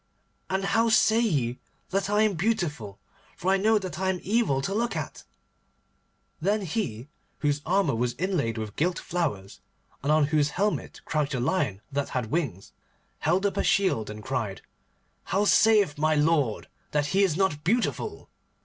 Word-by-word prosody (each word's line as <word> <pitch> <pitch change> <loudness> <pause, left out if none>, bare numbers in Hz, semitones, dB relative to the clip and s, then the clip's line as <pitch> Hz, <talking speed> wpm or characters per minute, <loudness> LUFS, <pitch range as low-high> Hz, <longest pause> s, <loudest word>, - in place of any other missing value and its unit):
And 190 +1 0
how 225 +3 +2
say 225 0 +4
ye 135 - 0 0.3
that 195 +1 0
I 210 +1 +3
am 215 -2 +2
beautiful, 160 - -2 0.4
for 185 - 0
I 195 - +4
know 215 +3 +3
that 185 -5 -5
I 190 0 0
am 185 -1 -1
evil 205 - +1
to 195 - -2
look 235 +3 -1
at?' - - -5 1.2
Then 205 +5 +1
he, 145 - -3 0.3
whose 145 -1 +1
armour 185 -5 +2
was 120 +1 -1
inlaid 155 -10 -1
with 110 -1 -5
gilt 175 +3 0
flowers, 135 - -3 0.4
and 140 - 0
on 155 -1 +4
whose 150 0 +2
helmet 205 +2 -1
crouched 150 -3 -1
a - - -1
lion 120 - 0
that 140 0 -2
had 125 -3 -3
wings, 135 - -2 0.5
held 180 +6 +1
up 200 - 0
a - - +1
shield, 185 - +2
and 105 0 -8
cried, 110 -7 -3 0.6
'How 195 +3 +1
saith 205 -9 +4
my 155 +1 +3
lord 150 -7 +1 0.3
that 145 -1 +2
he 195 - +4
is 175 -5 +1
not 185 -6 0
beautiful? 230 +7 -1
160 Hz, 165 wpm, -27 LUFS, 135-195 Hz, 1.2 s, say